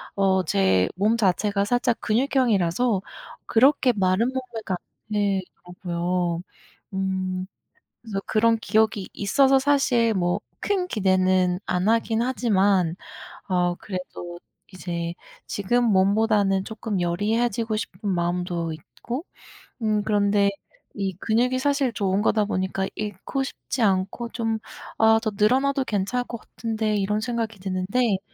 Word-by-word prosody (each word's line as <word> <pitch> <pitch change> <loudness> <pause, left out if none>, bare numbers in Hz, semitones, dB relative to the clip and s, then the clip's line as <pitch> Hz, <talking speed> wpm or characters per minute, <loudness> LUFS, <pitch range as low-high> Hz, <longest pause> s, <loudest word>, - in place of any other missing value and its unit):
어 190 -1 +2
제 95 -7 +2
몸 210 +5 +2
자체가 200 0 +1
살짝 245 +1 +1
근육형이라서 225 - +1 0.4
그렇게 260 +2 +4
마른 190 +2 +2
몸매가 240 -7 -4
안 215 +4 -13
되더라고요. 180 -3 -2 0.5
음 185 -1 -2 0.6
그래서 210 -4 -4
그런 225 +1 +3
기억이 215 -1 +1
있어서 270 +7 +3
사실 260 -5 +2
뭐 175 -2 +1 0.2
큰 380 -3 0
기대는 185 - +2
안 180 +3 0
하긴 225 0 +2
하지만 200 -8 +2 0.5
아 180 -1 +1
그래도 180 -2 -7 0.3
이제 170 -2 -4 0.3
지금 240 +5 0
몸보다는 200 -1 +3
쪼끔 215 -2 -4
여리해지고 220 +5 0
싶은 205 -2 -5
마음도 175 -1 -1
있고 240 - -7 0.6
음 215 -1 +1
그런데 205 -1 +3 0.4
이 195 -2 -2
근육이 245 +3 +1
사실 280 -1 +1
좋은 195 -1 0
거다 215 -1 +2
보니까 190 -1 -1
잃고 210 +6 -3
싶지 265 - -5
않고 195 +3 +1
좀 225 -2 -1 0.4
'아. 220 0 +5
더 220 - 0
늘어나도 265 +7 +2
괜찮을 215 +3 -1
것 235 - -6
같은데.' 220 -2 -2
이런 210 +2 0
생각이 225 -2 -3
드는데 195 +4 0
205 Hz, 265 characters per minute, -24 LUFS, 185-230 Hz, 0.6 s, 아